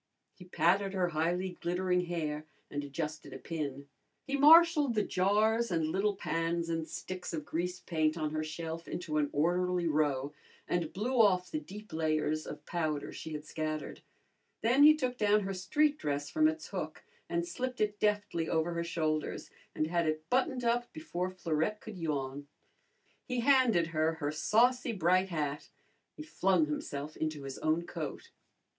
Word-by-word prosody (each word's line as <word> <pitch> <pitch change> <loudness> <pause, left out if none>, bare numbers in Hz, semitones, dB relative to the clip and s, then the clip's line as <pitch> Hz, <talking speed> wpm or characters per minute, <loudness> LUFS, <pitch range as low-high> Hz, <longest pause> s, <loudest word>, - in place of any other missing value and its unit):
He 180 - -14
patted 190 +3 +2
her 180 -2 +1
highly 175 +3 -1
glittering 180 +1 +1
hair 155 -3 -3 0.2
and 145 0 -3
adjusted 150 +2 -5
a - - -6
pin. 140 -4 -5 0.4
He 280 - -1
marshalled 300 -2 +7
the 210 - +2
jars 215 +5 +2
and 165 -3 0
little 200 +4 +1
pans 165 -2 -1
and 165 -1 -2
sticks 185 -2 -6
of 155 -2 -5
grease 180 +2 -3
paint 155 -1 0
on 155 -2 -1
her 155 0 -1
shelf 160 +1 -5
into 155 -3 -2
an 145 -1 +1
orderly 180 +3 +1
row 145 -2 +1 0.3
and 170 -3 -1
blew 235 +5 +1
off 185 -4 +3
the 310 - -1
deep 210 - -11
layers 155 -1 0
of - - -8
powder 155 -4 -2
she 160 - -7
had 150 0 -6
scattered. 155 -1 -4 0.6
Then 245 +5 +4
he 305 +1 +9
took 250 -3 -2
down 210 0 +4
her 195 0 -3
street 290 +12 +1
dress 145 0 -2
from 310 0 +4
its 315 +1 -3
hook - - -5 0.3
and 345 0 -1
slipped 255 -6 -4
it 210 -1 0
deftly 205 -6 0
over 165 +1 +1
her 170 0 -1
shoulders 155 -2 -2 0.2
and 155 - +1
had 170 0 0
it 155 0 -2
buttoned 255 0 +1
up 240 +1 +1
before 185 - -3
Florette 180 +2 -1
could 210 -4 -9
yawn. 145 -3 -3 0.8
He 250 -2 -1
handed 245 -9 +4
her 155 +1 +2
her 145 -2 -2
saucy 240 +9 +2
bright 185 0 +2
hat. 150 -3 -3 0.5
He 305 - -6
flung 190 - +2
himself 150 0 -4
into 155 -2 -3
his 135 -1 -6
own 160 +2 +1
coat. 160 -5 -6
175 Hz, 165 wpm, -32 LUFS, 155-210 Hz, 0.8 s, he